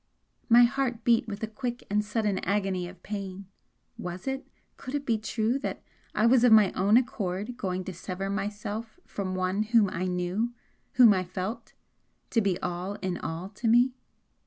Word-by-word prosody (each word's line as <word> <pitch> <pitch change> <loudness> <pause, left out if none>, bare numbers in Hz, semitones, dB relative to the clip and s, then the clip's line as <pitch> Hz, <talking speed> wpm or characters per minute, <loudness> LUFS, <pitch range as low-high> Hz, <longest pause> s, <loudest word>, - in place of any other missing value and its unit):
My 240 +1 +8
heart 245 -2 0
beat 230 0 +3
with 205 0 -6
a - - 0
quick 240 +2 -5
and 210 +1 +1
sudden 210 -2 0
agony 190 -2 -1
of 180 0 -13
pain 195 -2 -5 0.5
was 180 +1 -6
it, 270 0 -3 0.3
could 260 +2 -6
it 285 -1 -2
be 225 -4 +1
true 225 +4 0
that - - -4 0.3
I 215 - +3
was 245 +1 +5
of 245 - +6
my 215 -4 +7
own 200 +4 +4
accord 210 -2 -2
going 185 -6 -3
to 185 - -6
sever 185 +3 -5
myself 210 - -4
from 185 -2 -4
one 185 +2 0
whom 215 -3 +3
I 180 +2 -2
knew, 180 +7 -1 0.4
whom 240 -4 +8
I 185 -1 0
felt 185 +5 -5 0.6
to 230 - +3
be 195 -4 0
all 180 +3 -3
in 185 -2 -2
all 165 +4 -5
to 215 +3 -4
me? 240 +3 +5
210 Hz, 180 wpm, -28 LUFS, 185-235 Hz, 0.6 s, My